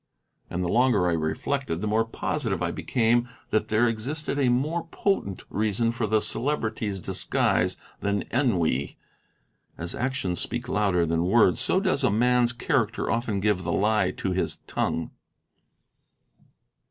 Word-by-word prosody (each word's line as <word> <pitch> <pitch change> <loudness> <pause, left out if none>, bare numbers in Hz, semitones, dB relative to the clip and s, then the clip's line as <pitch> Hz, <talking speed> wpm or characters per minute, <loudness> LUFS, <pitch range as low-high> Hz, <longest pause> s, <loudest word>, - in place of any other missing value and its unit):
And 90 +1 -2
the - - -1
longer 115 -3 +3
I 85 - +2
reflected, 80 - -2
the 105 - -3
more 110 +2 +2
positive 115 - -2
I - - -1
became 120 0 +1 0.2
that 110 0 +1
there 110 +3 +3
existed 140 +7 -2
a 130 -3 +3
more 155 +7 0
potent 165 - -1
reason 110 +2 0
for 115 -1 -2
the 110 0 +2
Celebrity's 110 -4 -1
disguise - - +1 0.2
than 100 0 -1
ennui. 90 - 0 0.8
As 85 +1 -4
actions 130 -9 -2
speak 120 +1 -3
louder 100 -7 +2
than 85 +1 0
words, 95 -3 +4
so 185 - +2
does 185 -8 0
a 130 - +4
man's 120 +3 +3
character 120 -2 0
often 115 -3 -1
give 100 -2 +1
the 85 - -2
lie 105 +5 +2
to 95 - -3
his 90 0 -1
tongue. 80 - -2
110 Hz, 145 wpm, -26 LUFS, 95-125 Hz, 0.8 s, words